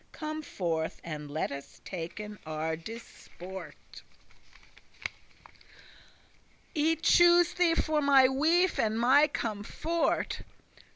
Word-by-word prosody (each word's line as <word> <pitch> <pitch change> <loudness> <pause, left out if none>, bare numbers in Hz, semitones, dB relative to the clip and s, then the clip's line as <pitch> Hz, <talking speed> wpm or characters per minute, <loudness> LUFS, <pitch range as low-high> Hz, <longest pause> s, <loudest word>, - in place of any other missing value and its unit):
Come 310 0 -5
forth, 165 - -3
and 150 -3 -6
let 155 +2 -2
us 140 0 -9
taken 200 +4 -6
our 155 +1 -3
disport; 190 -1 -10 2.7
I 320 +2 +2
choose 345 +1 +5
thee 350 -2 +2
for 310 -2 +1
my 275 -2 +6
wife 325 +7 +2
and 220 0 +1
my 270 +5 +5
comfort." 245 +7 -2
235 Hz, 95 wpm, -29 LUFS, -, 2.7 s, my